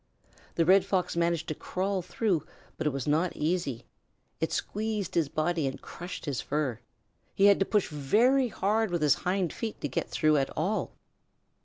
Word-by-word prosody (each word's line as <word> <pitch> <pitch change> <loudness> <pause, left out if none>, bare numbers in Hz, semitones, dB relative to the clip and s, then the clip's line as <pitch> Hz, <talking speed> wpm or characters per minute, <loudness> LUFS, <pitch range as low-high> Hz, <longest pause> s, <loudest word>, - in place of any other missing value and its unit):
The 165 - +2
Red 190 +2 +6
Fox 190 -3 -1
managed 170 -1 0
to - - 0
crawl 190 +5 -2 0.2
though, 195 -9 +2 0.3
but 160 - -2
it - - +2
was 135 -2 -4
not 160 +4 +1
easy. 155 -6 -1 0.5
It - - -1
squeezed 210 -3 -2
his 165 -5 +1
body 155 0 0
and 135 - -4
crushed 175 +1 -8
his 140 -5 -2
fur. 135 -6 -2 0.6
He 195 - +4
had 200 -1 +6
to 195 - +1
push 210 -3 +2
very 225 - +3
hard 215 0 0
with 175 -3 -1
his 150 - +6
hind 180 -2 -1
feet 225 -2 -5
to - - -1
get 130 - -3
through 155 -1 +3
at 135 -1 +1
all. 190 +8 -1
175 Hz, 180 wpm, -29 LUFS, 150-200 Hz, 0.6 s, Red